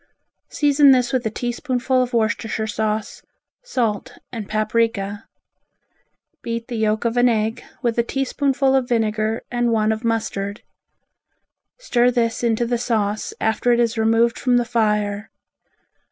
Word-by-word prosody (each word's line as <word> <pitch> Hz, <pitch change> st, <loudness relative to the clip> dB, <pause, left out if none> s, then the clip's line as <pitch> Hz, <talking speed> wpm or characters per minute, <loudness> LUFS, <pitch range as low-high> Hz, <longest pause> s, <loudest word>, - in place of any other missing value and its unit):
Season 290 Hz, -1 st, +4 dB
this 250 Hz, -2 st, +4 dB
with 255 Hz, -2 st, +1 dB
a -, -, -1 dB
teaspoonful 250 Hz, +2 st, -1 dB
of 250 Hz, -1 st, -1 dB
Worcestershire 220 Hz, -1 st, -1 dB
sauce, 215 Hz, 0 st, -2 dB, 0.4 s
salt 230 Hz, -, -2 dB
and 225 Hz, -4 st, -6 dB
paprika. 215 Hz, -1 st, -1 dB, 1.1 s
Beat 230 Hz, 0 st, -4 dB
the 240 Hz, -, -4 dB
yolk 220 Hz, 0 st, 0 dB
of 235 Hz, +1 st, 0 dB
an 245 Hz, 0 st, +5 dB
egg 225 Hz, +1 st, -1 dB, 0.2 s
with 235 Hz, -1 st, 0 dB
a -, -, +4 dB
teaspoonful 270 Hz, +1 st, 0 dB
of 260 Hz, -2 st, +1 dB
vinegar 220 Hz, -1 st, 0 dB
and 240 Hz, -1 st, +1 dB
one 220 Hz, -1 st, +2 dB
of 220 Hz, +2 st, -3 dB
mustard. 210 Hz, -3 st, -2 dB, 1.1 s
Stir 250 Hz, -, +2 dB
this 235 Hz, -1 st, 0 dB
into 235 Hz, 0 st, +1 dB
the 240 Hz, 0 st, -1 dB
sauce 215 Hz, -3 st, -1 dB
after 220 Hz, +2 st, +1 dB
it 235 Hz, -, +2 dB
is 235 Hz, -1 st, +1 dB
removed 225 Hz, +1 st, +2 dB
from 250 Hz, -2 st, +2 dB
the 240 Hz, -, +1 dB
fire. 210 Hz, -2 st, 0 dB
230 Hz, 140 wpm, -21 LUFS, 220-245 Hz, 1.1 s, an